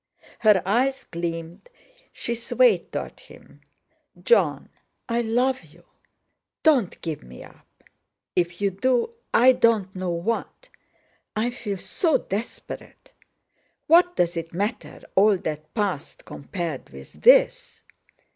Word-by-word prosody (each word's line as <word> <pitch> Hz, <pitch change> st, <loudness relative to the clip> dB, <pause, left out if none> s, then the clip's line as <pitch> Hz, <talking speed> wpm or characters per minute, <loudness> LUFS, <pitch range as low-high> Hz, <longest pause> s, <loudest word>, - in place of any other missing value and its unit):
Her 210 Hz, -4 st, +4 dB
eyes 260 Hz, +7 st, +1 dB
gleamed, 170 Hz, -, -5 dB, 0.4 s
she 235 Hz, -, -3 dB
swayed 455 Hz, -, +2 dB
toward -, -, -5 dB
him. -, -, -17 dB, 0.6 s
"Jon—I 240 Hz, -, 0 dB
love 245 Hz, +3 st, +1 dB
you! 165 Hz, +1 st, -20 dB, 0.8 s
Don't 270 Hz, -, +3 dB
give 160 Hz, -3 st, -4 dB
me 60 Hz, 0 st, -12 dB
up! -, -, -20 dB, 0.5 s
If 175 Hz, +1 st, -1 dB
you 200 Hz, -1 st, +2 dB
do, 245 Hz, -, 0 dB, 0.2 s
I 255 Hz, +2 st, +6 dB
don't 220 Hz, -6 st, +2 dB
know 185 Hz, -1 st, -3 dB
what—I 225 Hz, -, -5 dB
feel 210 Hz, -5 st, -5 dB
so 320 Hz, -, +1 dB
desperate. 210 Hz, +5 st, -7 dB, 0.7 s
What 355 Hz, +2 st, +5 dB
does 175 Hz, 0 st, +1 dB
it 165 Hz, 0 st, -5 dB
matter—all 205 Hz, 0 st, 0 dB
that 155 Hz, -2 st, -6 dB
past 195 Hz, -9 st, -3 dB
compared 165 Hz, -2 st, -6 dB
with -, -, -13 dB
this?" -, -, +4 dB
210 Hz, 110 wpm, -24 LUFS, 175-255 Hz, 0.8 s, I